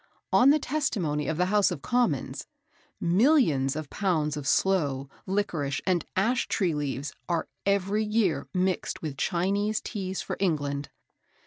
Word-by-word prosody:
On 255 - +7
the 295 - +6
testimony 200 - -1
of 160 - -1
the 180 - +2
House 205 +1 +3
of 175 -7 -5
Commons, 240 - 0 0.5
"millions 170 - +3
of 155 -1 -4
pounds 160 -7 0
of 145 -2 -5
sloe, 140 -7 +1 0.2
liquorice, 165 -8 -1
and 180 -3 +1
ash 235 +6 +1
tree 180 -5 +1
leaves, 145 -1 -3 0.2
are 170 -2 0 0.2
every 200 +2 +2
year 210 -5 +1
mixed 185 -2 -1
with 150 -3 -4
Chinese 200 +7 0
Teas 190 -3 -4
for - - -4
England." 145 -6 -1
180 Hz, 140 wpm, -27 LUFS, 150-205 Hz, 0.5 s, On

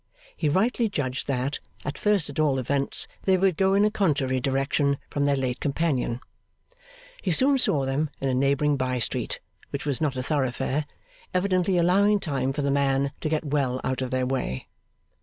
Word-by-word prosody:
He 155 - 0
rightly 225 - +2
judged 135 -8 -3
that, 135 +1 -1 0.3
at 145 - -3
first 210 -6 +1
at 145 - -6
all 145 -3 +3
events, 135 +2 0 0.2
they 190 -1 +4
would 185 -2 +2
go 190 +3 +3
in 200 +1 +4
a 215 - +2
contrary 145 -11 +1
direction 135 +2 +1
from 140 0 0
their 140 0 +3
late 130 -2 -2
companion. 140 -5 -1 1.0
He 190 - -2
soon 265 - +4
saw 140 - +2
them 140 +3 0
in 135 - -1
a 130 - +1
neighbouring 140 +2 +2
bye 130 -1 -1
street, 115 - -1 0.3
which 140 - -5
was 145 -2 -1
not 145 -4 0
a 130 - -2
thoroughfare, 140 +1 -1 0.5
evidently 185 0 +2
allowing 200 +4 +4
time 135 -7 -1
for 145 +1 -2
the 140 - +1
man 140 0 +1
to 155 - -1
get 155 0 -1
well 135 -3 0
out 130 0 -1
of 130 - -2
their 130 0 0
way. 125 - -2
140 Hz, 185 wpm, -26 LUFS, 130-170 Hz, 1.0 s, they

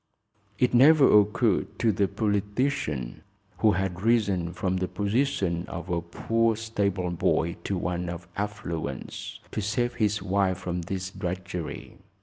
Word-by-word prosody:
It 125 - +2
never 135 -3 +7
occurred 105 0 0
to 115 - +3
the 100 0 +1
politician, 105 - -1 0.4
who 110 -2 +4
had 95 -2 -2
risen 100 -6 +2
from 95 +1 -1
the 95 0 -1
position 100 - 0
of 85 +3 -6
a 85 -1 0
poor 115 +6 0
stable 100 -5 -1
boy 85 0 +1
to 100 - -1
one 90 0 -2
of 85 0 -7
affluence, 85 -9 -5
to - - -2
save 120 +4 0
his 105 -1 +1
wife 95 -1 +1
from 90 -1 -3
this 95 +2 -4
drudgery. 90 -4 -5
95 Hz, 135 wpm, -27 LUFS, 90-110 Hz, 0.4 s, never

